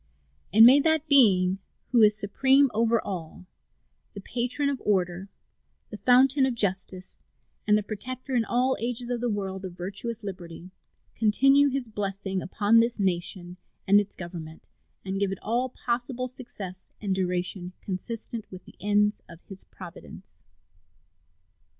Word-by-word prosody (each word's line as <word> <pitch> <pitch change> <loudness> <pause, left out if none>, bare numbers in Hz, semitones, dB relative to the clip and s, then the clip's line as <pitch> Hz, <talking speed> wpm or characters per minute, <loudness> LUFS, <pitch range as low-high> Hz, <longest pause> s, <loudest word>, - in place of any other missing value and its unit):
And 220 +2 +8
may 260 +4 +8
that 315 +1 +2
Being 195 -10 +5 0.3
who 240 -3 +5
is 210 -1 +5
supreme 265 +6 +3
over 230 +1 +2
all, 180 -4 -7 0.7
the - - -6
Patron 250 +7 -2
of 280 -2 -2
Order, 185 -1 0 0.6
the 210 - -6
Fountain 265 +3 +4
of 255 - -2
Justice, 190 -3 -3 0.5
and 210 0 +5
the 210 - -1
Protector 255 +6 -6
in 240 -2 +3
all 250 +4 +1
ages 240 +1 -3
of 240 -1 -2
the 245 - 0
world 195 -2 -4
of 185 -2 -6
virtuous 210 +5 -5
liberty, 180 -2 -8 0.4
continue 275 +6 +4
His 270 -2 -2
blessing 195 -2 -3
upon 205 +5 +3
this 235 0 +1
nation 180 -1 -2 0.3
and 200 +1 +6
its 205 -1 -4
Government 170 -3 -8 0.4
and 190 0 -3
give 200 -1 0
it 195 - -4
all 245 +4 0
possible 245 +1 -3
success 200 -7 -10
and 200 -3 -1
duration 180 0 -2
consistent 220 +3 -6
with 185 -1 -11
the - - -17
ends 210 +1 +1
of 170 -2 -12
His 195 -1 -9
providence. 180 -3 -12
210 Hz, 145 wpm, -26 LUFS, 190-245 Hz, 0.7 s, And